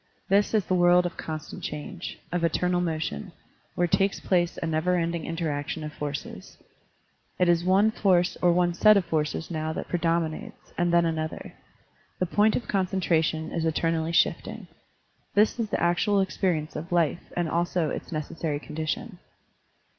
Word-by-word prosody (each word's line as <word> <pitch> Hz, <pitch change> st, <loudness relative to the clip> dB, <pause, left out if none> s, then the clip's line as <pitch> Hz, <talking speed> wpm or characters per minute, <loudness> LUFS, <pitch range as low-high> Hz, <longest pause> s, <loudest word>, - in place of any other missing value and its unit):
This 205 Hz, +3 st, +3 dB
is 210 Hz, -4 st, +2 dB
the -, -, -1 dB
world 175 Hz, 0 st, +5 dB
of 175 Hz, -, -3 dB
constant 155 Hz, -1 st, -6 dB
change, 160 Hz, +5 st, -6 dB
of 175 Hz, -1 st, -1 dB
eternal 180 Hz, +2 st, +1 dB
motion, 155 Hz, -, -3 dB, 0.4 s
where 175 Hz, -, +2 dB
takes 195 Hz, +3 st, +1 dB
place 175 Hz, -2 st, +1 dB
a -, -, -3 dB
never 160 Hz, +3 st, +1 dB
ending 170 Hz, -1 st, -1 dB
interaction 160 Hz, -2 st, -3 dB
of 150 Hz, -1 st, -6 dB
forces. 145 Hz, -1 st, -6 dB, 0.8 s
It 180 Hz, -, +3 dB
is 170 Hz, 0 st, +3 dB
one 195 Hz, +4 st, +4 dB
force 185 Hz, -4 st, +2 dB
or 175 Hz, -, +5 dB
one 175 Hz, 0 st, +2 dB
set 215 Hz, +4 st, +6 dB
of 190 Hz, -, +1 dB
forces 155 Hz, +1 st, -2 dB
now 160 Hz, -1 st, -2 dB
that -, -, -5 dB
predomi 165 Hz, -2 st, +1 dB
nates, 220 Hz, +7 st, -11 dB
and 175 Hz, 0 st, +1 dB
then 170 Hz, 0 st, +4 dB
another. 160 Hz, -1 st, -3 dB, 0.6 s
The 185 Hz, -, 0 dB
point 210 Hz, +4 st, +3 dB
of 250 Hz, -, -1 dB
concen 190 Hz, -1 st, 0 dB
tration 160 Hz, -2 st, 0 dB
is 165 Hz, -, -1 dB
eternally 165 Hz, 0 st, 0 dB
shifting. 170 Hz, -, 0 dB, 0.7 s
This 210 Hz, +3 st, +3 dB
is 220 Hz, -2 st, -1 dB
the -, -, -1 dB
actual 175 Hz, +4 st, +2 dB
experience 180 Hz, -5 st, -1 dB
of 155 Hz, +3 st, -6 dB
life 170 Hz, -1 st, 0 dB
and 175 Hz, -1 st, +1 dB
also 170 Hz, -1 st, 0 dB
its -, -, -6 dB
necessary 155 Hz, -1 st, -3 dB
condition. 160 Hz, +7 st, -4 dB
170 Hz, 165 wpm, -26 LUFS, 160-180 Hz, 0.8 s, set